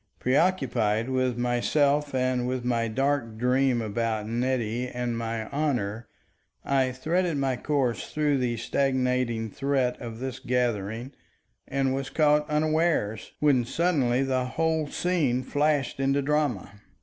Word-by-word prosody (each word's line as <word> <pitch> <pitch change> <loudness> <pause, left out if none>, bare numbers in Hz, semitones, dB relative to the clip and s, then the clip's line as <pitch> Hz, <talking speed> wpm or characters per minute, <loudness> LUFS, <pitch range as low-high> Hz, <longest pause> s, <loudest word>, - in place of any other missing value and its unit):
Preoccupied 125 - +1
with 130 -2 0
myself 140 +4 +1
and 125 -1 +1
with 125 -1 -2
my 115 -2 +1
dark 130 -1 -1
dream 125 0 +2
about 110 0 -2
Nettie 120 0 -1
and 125 -1 -3
my 115 -1 -3
honor, 120 -7 -1 0.6
I 135 -2 +2
threaded 165 +5 0
my 135 -2 0
course 135 -3 -1
through 150 -2 +1
the 120 -2 -1
stagnating 125 -3 0
threat 135 -1 0
of 115 -2 -6
this 130 +1 -5
gathering, 120 -1 -1 0.6
and 135 -1 0
was 135 0 -3
caught 150 -1 +2
unawares, 155 -8 0
when 140 -5 +4
suddenly 135 -3 +1
the 130 -1 0
whole 160 +3 0
scene 145 -7 0
flashed 145 -1 0
into 135 +1 +1
drama. 135 -9 -1
130 Hz, 125 wpm, -26 LUFS, 120-145 Hz, 0.6 s, when